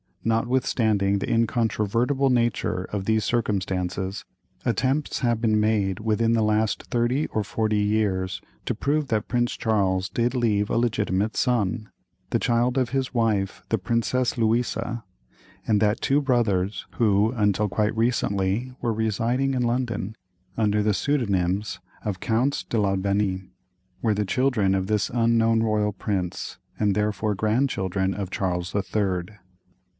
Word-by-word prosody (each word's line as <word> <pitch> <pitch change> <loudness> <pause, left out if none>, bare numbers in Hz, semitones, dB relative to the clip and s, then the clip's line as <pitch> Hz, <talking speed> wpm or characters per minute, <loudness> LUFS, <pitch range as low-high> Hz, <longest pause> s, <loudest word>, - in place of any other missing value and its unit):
Notwithstanding 110 -4 +1
the - - -3
incontrovertible 115 +3 +1
nature 115 -6 0
of 100 -2 -4
these 110 0 +2
circumstances, 95 -4 -1 0.4
attempts 135 +3 0
have 120 -3 0
been 110 -2 +3
made 105 -3 +1
within 115 +1 +1
the 115 -1 +2
last 110 0 +1
thirty 125 +5 0
or 110 - -2
forty 110 +1 0
years 105 -3 0 0.3
to - - -1
prove 150 +1 0
that 110 -3 -1
Prince 120 0 0
Charles 95 -4 +1
did 120 +2 0
leave 105 -4 +1
a - - +1
legitimate 110 -3 0
son, 115 -3 0 0.4
the - - +1
child 120 +2 +1
of 125 -2 0
his 135 0 -2
wife 105 -4 0
the 115 - +1
Princess 120 +5 0
Louisa; 115 +1 0 0.6
and 105 -2 +3
that 105 +1 +2
two 140 +2 +2
brothers, 110 -8 0
who 105 -1 +3
until 105 -3 +1
quite 105 +2 0
recently 115 0 0
were 115 -2 0
residing 115 +5 0
in 125 - +1
London 120 -4 -1 0.4
under 105 -2 +2
the 105 -1 +2
pseudonyms 100 -8 0 0.2
of 100 -4 -3
"Counts 120 +7 0
d'Albanie," 100 -2 0 0.5
were 110 -3 +2
the 105 0 0
children 110 -3 +1
of 95 -1 0
this 105 0 +1
unknown 115 -1 +3
royal 105 -2 +1
prince, 95 -3 -3 0.2
and 105 -2 +2
therefore 105 0 0
grandchildren 95 -4 0
of 95 -1 -4
"Charles 90 -1 -2
the 100 - 0
Third." 95 -1 -2
110 Hz, 140 wpm, -25 LUFS, 100-120 Hz, 0.6 s, been